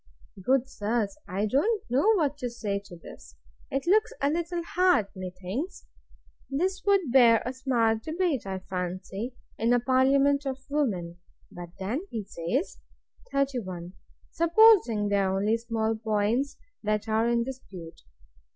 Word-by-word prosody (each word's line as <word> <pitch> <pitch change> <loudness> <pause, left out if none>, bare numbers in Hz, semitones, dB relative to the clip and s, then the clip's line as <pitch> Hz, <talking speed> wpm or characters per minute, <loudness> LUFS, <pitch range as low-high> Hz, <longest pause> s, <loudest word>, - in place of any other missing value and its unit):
Good 260 +5 +2
sirs! 210 -4 -2
I 195 +3 -1
don't 375 - +1
know 280 - +3
what 295 -6 +1
to 250 - -2
say 210 -4 -3
to 190 -3 -11
this! - - -13 0.3
It 275 -1 -2
looks 425 +7 +3
a 280 - +1
little 340 +1 -2
hard, 360 - +3
methinks! 185 - -5 0.6
This 370 +7 -1
would 385 -9 +3
bear 235 -3 +6
a 250 - -3
smart 235 -4 +1
debate, 315 - -1
I 190 -1 -3
fancy, 185 +6 -4 0.2
in 230 +2 +3
a 245 - +4
parliament 275 +3 +3
of 265 0 -5
women. 185 - -1 0.3
But 175 -1 -9
then 240 - -3
he 220 -2 -4
says, 200 - -3 0.5
31. 195 -11 -2 0.4
Supposing 335 - +5
they 200 - +2
are 190 -1 +1
only 210 +3 +2
small 225 -1 -1
points 220 +5 0 0.2
that 210 0 -1
are 220 +1 +2
in 235 0 +2
dispute. 195 -10 -9
235 Hz, 140 wpm, -27 LUFS, 205-280 Hz, 0.6 s, bear